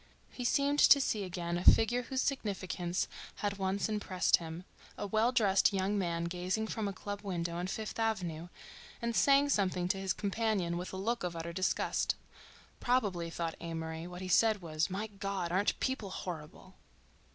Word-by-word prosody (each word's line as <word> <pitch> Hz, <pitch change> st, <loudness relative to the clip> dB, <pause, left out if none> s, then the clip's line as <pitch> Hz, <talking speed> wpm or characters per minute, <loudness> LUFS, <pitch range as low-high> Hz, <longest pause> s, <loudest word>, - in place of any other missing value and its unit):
He 250 Hz, -, -6 dB
seemed 285 Hz, +3 st, +2 dB
to 285 Hz, -, +8 dB
see 215 Hz, -6 st, 0 dB
again 175 Hz, -2 st, -3 dB
a -, -, -5 dB
figure 240 Hz, +5 st, +6 dB
whose 260 Hz, +2 st, -2 dB
significance 190 Hz, -8 st, -2 dB, 0.3 s
had 200 Hz, -1 st, -3 dB
once 190 Hz, +1 st, 0 dB
impressed 205 Hz, -4 st, +2 dB
him—a 170 Hz, +4 st, -9 dB
well 220 Hz, +4 st, +2 dB
dressed 205 Hz, -5 st, +4 dB
young 195 Hz, +1 st, 0 dB
man 170 Hz, -4 st, -1 dB
gazing 180 Hz, +5 st, -1 dB
from 220 Hz, -2 st, -2 dB
a -, -, -2 dB
club 205 Hz, +1 st, -6 dB
window 170 Hz, -4 st, -3 dB
on 175 Hz, +1 st, -2 dB
Fifth 215 Hz, +3 st, -4 dB
Avenue 180 Hz, -7 st, -1 dB, 0.5 s
and 235 Hz, 0 st, -2 dB
saying 280 Hz, +3 st, +5 dB
something 185 Hz, -7 st, +1 dB
to 195 Hz, -, 0 dB
his 190 Hz, -1 st, 0 dB
companion 200 Hz, -4 st, 0 dB
with 180 Hz, +1 st, -4 dB
a 190 Hz, -, -5 dB
look 230 Hz, +4 st, -1 dB
of 175 Hz, -1 st, -3 dB
utter 165 Hz, +1 st, -5 dB
disgust. 185 Hz, +2 st, 0 dB, 0.6 s
Probably, 200 Hz, -9 st, +1 dB
thought 165 Hz, -1 st, -3 dB
Amory, 165 Hz, 0 st, -4 dB
what 180 Hz, 0 st, -8 dB
he -, -, -4 dB
said 215 Hz, +1 st, +3 dB
was: 155 Hz, -1 st, -1 dB
"My 195 Hz, +4 st, -2 dB
God! 195 Hz, -4 st, -3 dB
Aren't 190 Hz, +3 st, +1 dB
people 260 Hz, -7 st, -1 dB
horrible!" 170 Hz, -5 st, -7 dB
190 Hz, 170 wpm, -33 LUFS, 175-220 Hz, 0.6 s, to